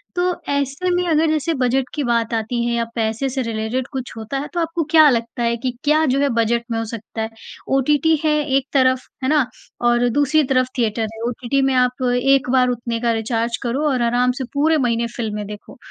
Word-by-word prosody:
तो 360 0 +1 0.2
ऐसे 280 +5 -1
में 355 0 +1
अगर 320 +1 +3
जैसे 315 +2 0
बजट 260 -1 0
की 295 - -2
बात 235 -2 0
आती 225 +2 -1
है 235 - 0
या 235 0 0
पैसे 225 +3 -1
से 265 +1 -2
रिलेटेड 230 +2 -2
कुछ 260 -3 -5
होता 225 +5 -4
है 290 - -4
तो 345 - -1
आपको 330 0 -1
क्या 315 -2 +7
लगता 235 -1 -1
है 235 0 +1
कि 250 +1 -2
क्या 305 +2 +3
जो 275 - +1
है 285 - +2
बजट 235 +1 +1
में 225 - 0
हो 225 - -1
सकता 220 0 -7
है? 220 - -2 0.4
ओटीटी 295 +4 +3
है 310 - +3 0.3
एक 270 - -1
तरफ़, 260 -1 +3 0.2
है 260 - +1
ना? 300 -4 +3 0.4
और 240 0 +3
दूसरी 290 +4 +2
तरफ़ 255 -1 +1
थिएटर 225 -2 0
है। 225 - -10
ओटीटी 250 +3 -1
में 270 0 +2
आप 250 +1 +1
एक 265 +1 +2
बार 255 -1 +4
उतने 235 -1 -3
का 235 -1 +1
रिचार्ज 230 +1 -1
करो 260 +5 -1
और 255 -3 0
आराम 245 +2 +2
से 265 - -2
पूरे 310 +3 +3
महीने 235 -3 0
फिल्में 210 -3 -3
देखो। 210 0 -10
250 Hz, 220 wpm, -20 LUFS, 235-280 Hz, 0.4 s, क्या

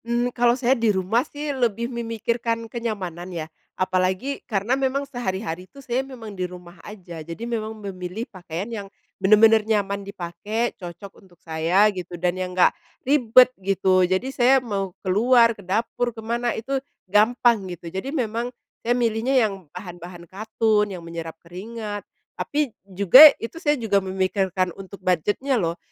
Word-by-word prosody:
Mmm, 240 +1 0
kalau 240 0 +3
saya 255 0 +3
di 230 -4 +1
rumah 195 +4 +2
sih 295 +1 -5
lebih 235 -3 0
memikirkan 230 0 -2
kenyamanan 200 -7 -5
ya. 170 -3 -4 0.3
Apalagi 185 +8 0
karena 210 +2 0
memang 275 +1 0
sehari-hari 190 - -4
tuh 280 - -14
saya 245 +1 0
memang 250 -6 -9
di 185 -2 -3
rumah 175 -1 -12
aja. 180 -6 -9
Jadi 165 +8 -7
memang 220 -2 -3
memilih 195 +1 -6
pakaian 185 +1 -6
yang 210 -4 -5 0.3
bener-bener 220 +2 +6
nyaman 205 -2 0
dipakai, 200 +4 -3
cocok 185 +2 -10
untuk 180 -3 -22
saya 165 +5 +2
gitu, 180 -1 -6
dan 175 +1 0
yang 185 0 -5
enggak 180 - +5 0.3
ribet 255 -2 +5
gitu, 190 -1 +2
jadi 185 +5 +1
saya 255 +1 +5
mau 195 -4 -3
keluar, 230 +5 +4
ke 210 - -14
dapur, 225 +5 -1
ke 225 -1 -10
mana, 235 +1 -1
itu 265 +4 -2 0.2
gampang 215 0 +3
gitu. 170 -1 -8
Jadi 190 +8 -4
memang 240 -4 -2 0.3
saya 240 +1 +1
milihnya 235 +2 +1
yang 195 -6 -6
bahan-bahan 175 +1 -9
katun, 215 +2 0
yang 180 -4 -7
menyerap 165 -1 -7
keringat, 205 +5 -7 0.3
tapi 290 -5 -2
juga, 200 - +9
itu 325 +9 -7
saya 295 -3 +2
juga 210 -5 +1
memikirkan 190 -1 -1
untuk 195 +1 -10
budget-nya 205 - +1
loh. 170 0 -1
210 Hz, 155 wpm, -23 LUFS, 185-235 Hz, 0.3 s, juga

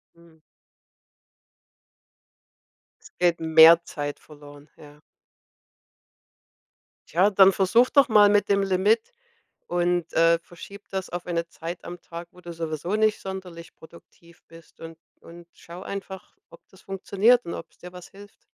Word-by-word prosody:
Mhm. 170 -1 -22 2.8
Es 175 - +4
geht 170 - -6
mehr 160 +1 +6
Zeit 145 -1 -6
verloren, 145 -1 -16
ja. 150 0 -16 2.1
Tja, 185 +6 +2
dann 195 -1 +5
versuche 230 +6 +2
doch 280 -3 +4
mal 210 -1 +5
mit 205 0 +1
dem 200 0 +2
Limit 200 - 0 0.5
und, 175 -1 -1
äh, 165 0 +3
verschiebe 200 +4 -14
das 190 -1 -5
auf 175 0 -7
eine 170 -1 -3
Zeit 170 +1 -9
am 175 0 -9
Tag, 170 0 -10
wo 180 - -19
du 170 -1 -9
sowieso 165 +3 -4
nicht 215 -1 +1
sonderlich 180 -3 -9
produktiv 170 +1 -19
bist, 165 -1 -18
und 165 0 -11 0.2
und 170 0 -15
schaue 175 +3 -13
einfach, 195 -1 -9
ob 170 - -16
das 190 - -20
funktioniert 200 +5 +1
und 170 - -6
ob's - - -12
dir 180 - -11
was 180 0 -13
hilft. 205 +1 -17
175 Hz, 140 wpm, -24 LUFS, 165-195 Hz, 2.8 s, mehr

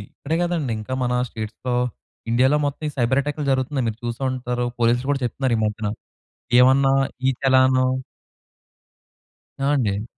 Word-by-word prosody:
ఇక్కడే 160 +3 -2
కాదండీ. 165 -8 -1
ఇంకా 130 - -5
మన 125 0 0 0.2
స్టేట్స్‌లో, 110 +3 -4 0.6
ఇండియాలో 130 +5 +4
మొత్తం 145 +2 -4
ఈ - - -8
సైబర్ 130 +3 +2
అటాక్లు 150 +1 -3
జరుగుతున్నాయి, 130 -1 0
మీరు 110 - -7
చూసే 120 +3 -4
ఉంటారు. 125 -1 -2
పోలీస్‌లు 120 +3 +2
కూడా 135 -2 -1
చెప్తున్నారు. 125 0 0
ఈ - - -1
మధ్యన 105 0 -2 0.7
ఏమన్నా 135 +1 +5 0.4
ఈ - - +5
చలాను 130 -1 +4 1.7
ఆ! 135 - -3
అండి. 105 -6 0
130 Hz, 140 wpm, -22 LUFS, 120-135 Hz, 1.7 s, ఏమన్నా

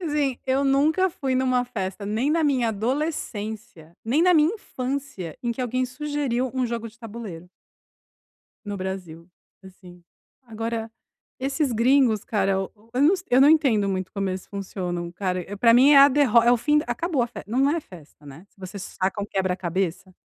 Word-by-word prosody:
Assim, 295 -6 -1
eu 270 +2 +1
nunca 300 +7 +3
fui 275 -7 -3
em 255 0 +1
uma 250 -1 +1
festa 200 -4 -5
nem 220 +7 -1
na 325 0 +2
minha 260 -6 +2
adolescência, 220 - -4
nem 265 +8 +1
na 360 0 +5
minha 310 +4 +4
infância, 260 - -5
em 240 -1 -1
que 255 - -7
alguém 255 +1 -1
sugeriu 260 -2 -2
um 255 -2 0
jogo 230 -1 -4
de 235 +2 -20
tabuleiro. 205 -7 -9 1.2
No 205 -1 -4
Brasil, 185 -3 -6 0.3
assim. 180 -2 -15 0.4
Agora, 225 0 -4 0.5
esses 270 +1 -1
gringos 235 -2 +3
cara, 195 -3 0
eu 205 +4 -5
não 335 +7 +5
se 365 - -9
eu 250 - +5
não 285 - +7
entendo 255 -11 +3
muito 185 -1 -3
como 195 -1 -2
eles 185 0 -5
funcionam 180 -3 -5
cara, 185 +1 -3
para 230 -1 +6
mim 265 +4 +6
é 285 - +8
a 275 +1 +9
derro 255 -5 +4
é 240 +1 +4
o 245 - +4
fim 300 +5 +2
d - - -5
acabou 275 +3 -1
a 240 - 0
festa, 220 -2 -10
não 270 +3 +3
é 330 +2 0
festa, 160 - -16
né, 145 +5 -12
se - - -31
você 190 +1 -8
saca 190 +2 -3
um - - -2
quebra-cabeça. 185 -1 -2
230 Hz, 185 wpm, -24 LUFS, 195-275 Hz, 1.2 s, a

